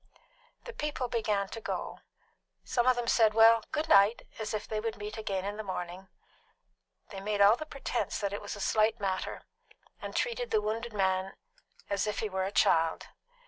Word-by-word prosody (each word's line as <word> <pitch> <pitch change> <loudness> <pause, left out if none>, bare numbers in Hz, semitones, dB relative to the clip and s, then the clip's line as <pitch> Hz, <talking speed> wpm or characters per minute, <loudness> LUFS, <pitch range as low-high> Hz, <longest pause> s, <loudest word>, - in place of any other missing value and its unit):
The 480 - -8
people 300 - -3
began 210 -4 0
to 225 - -7
go; - - -4 0.6
some 240 0 0
of 255 - +5
them 240 -1 -2
said, 220 -2 +4
"Well, 225 0 +7
good 310 +1 -1
night!" 205 -4 +5 0.2
as 220 - -3
if 215 - -3
they 215 - -2
would 225 +1 -3
meet 210 +1 -6
again 200 -4 -3
in 205 +1 -4
the 215 - -4
morning. 185 -1 -5 1.0
They 195 - -6
all - - -10
made 205 0 -1 0.2
the 310 - -6
pretence 275 -4 -3
that 200 -1 -2
it 205 - -4
was 205 - -6
a - - -10
slight 220 +3 +2
matter, 190 -2 -3 0.6
and - - -6
treated 485 0 -1
the - - +3
wounded 225 +3 -3
man 190 -1 0 0.5
as 200 +1 -1
if 210 - -2
he 215 - -2
were 190 -1 -1
a 195 - -3
child. 165 -4 +2
215 Hz, 190 wpm, -30 LUFS, 200-230 Hz, 1.0 s, Well